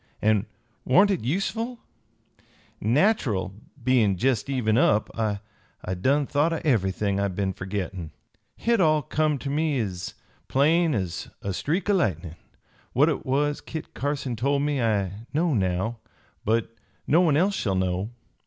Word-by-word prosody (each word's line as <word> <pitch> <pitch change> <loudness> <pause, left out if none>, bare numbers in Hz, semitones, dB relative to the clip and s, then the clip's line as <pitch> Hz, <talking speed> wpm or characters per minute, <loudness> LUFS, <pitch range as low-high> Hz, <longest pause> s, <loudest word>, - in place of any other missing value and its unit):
An' 110 0 +2 0.4
warn't 195 +10 +5
hit 180 - -1
useful? 205 - -1 1.0
Nach'erl, 115 - +2 0.3
bein' 115 -6 +3
jest 125 +2 +1
even 120 -5 +1
up, 110 -2 +3
I 110 -3 -1 0.5
done 135 +11 +2
thought 145 +4 +1
o' 165 - -1
everything 100 -5 +1
I 100 - +1
been 95 0 -2
fergettin'. 95 -3 -4 0.5
Hit 235 -3 +1
all 155 -3 +3
come 155 0 +1
ter 140 +1 -4
me 150 -2 +1
ez 95 -5 -4 0.3
plain 160 +3 +3
ez 95 -5 -3
a 100 - -2
streak 165 - -1
o' 205 - +3
lightnin'. 90 - 0 0.6
What 145 +6 +4
it 145 - -3
was 145 +2 +1
Kit 160 -2 -7
Carson 140 -3 -2
told 140 +5 +1
me 145 -3 0
I 105 -1 -1
know 165 0 +2
now, 95 +2 0 0.4
but 115 +1 0 0.3
no 165 +5 +4
one 155 -5 +3
else 190 +5 +3
shall 100 - -1
know. 95 +2 -1
125 Hz, 145 wpm, -25 LUFS, 100-150 Hz, 1.0 s, warn't